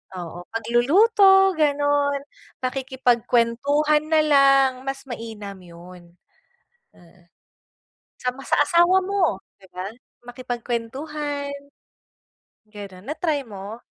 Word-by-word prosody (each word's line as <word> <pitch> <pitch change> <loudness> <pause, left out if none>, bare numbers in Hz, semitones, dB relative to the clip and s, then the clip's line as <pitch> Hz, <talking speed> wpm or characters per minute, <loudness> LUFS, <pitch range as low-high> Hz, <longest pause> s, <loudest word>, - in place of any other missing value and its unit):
oo 175 0 -8
pagluluto 385 - +4
ganun, 285 -1 +1 0.4
pakikipagkwentuhan 260 +3 +1
na 315 -1 +3
lang, 275 -2 +5 0.2
mas 270 0 -4
mainam 220 -6 -8
yun. 175 0 -15 0.8
Mm. 175 0 -22 0.9
Sa 250 - -3
ma 270 +2 -12
sa - - +2
asawa 345 +4 +3
mo 365 - -1 0.2
'di 190 - -18
ba, 190 +3 -5 0.3
makipagkwentuhan. 260 +4 -5 1.1
Ganun, 200 -3 -11
na-try 305 -1 -2
mo? 205 +1 -9
260 Hz, 90 wpm, -23 LUFS, 215-295 Hz, 1.1 s, lang